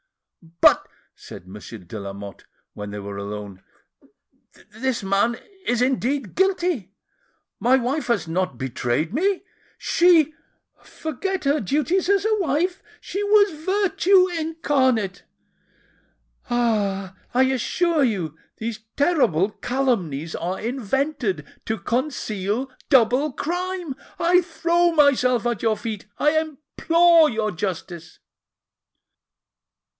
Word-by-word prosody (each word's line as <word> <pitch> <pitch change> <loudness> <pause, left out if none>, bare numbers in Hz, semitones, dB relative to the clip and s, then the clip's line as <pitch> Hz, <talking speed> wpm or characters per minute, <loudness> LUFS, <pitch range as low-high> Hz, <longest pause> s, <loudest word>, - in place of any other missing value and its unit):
"But," - - +5 0.3
said 90 - -12
Monsieur 105 +4 -9
de 95 +2 -9
Lamotte, 100 0 -8 0.3
when 105 0 -7
they 105 - -6
were 100 0 -6
alone, 100 -1 -7 1.1
"this 240 +1 -2
man 200 +5 +1 0.3
is 245 0 +2
indeed 260 -2 -1
guilty. 350 - 0 0.6
My 250 +2 +4
wife 265 +5 -1
has 230 -8 0
not 175 -5 -1
betrayed 130 - -2
me! 380 +7 +1 0.3
She!—forget 330 +2 0
her 285 +2 +2
duties 305 - 0
as 400 0 +3
a 435 0 +3
wife! 350 +2 0 0.2
she 395 - -4
was 410 -1 +5
virtue 385 0 +3
incarnate! 275 - 0 1.3
Ah! 205 -6 0 0.2
I 260 - +5
assure 290 +5 +1
you 185 - -1 0.2
these 225 -1 -4 0.2
terrible 240 - +2
calumnies 195 - -1
are 180 +3 -3
invented 240 - -2 0.2
to 220 - -1
conceal 235 0 -2 0.2
double 260 +3 +4
crime! 355 0 -3 0.2
I 355 +1 +4
throw 345 0 +1
myself 255 -5 +3
at 240 -3 -1
your 220 -2 +1
feet,—I 220 +8 -1
implore 320 +2 +3
your 220 -2 -1
justice!" 175 -2 -5
250 Hz, 105 wpm, -23 LUFS, 195-325 Hz, 1.3 s, But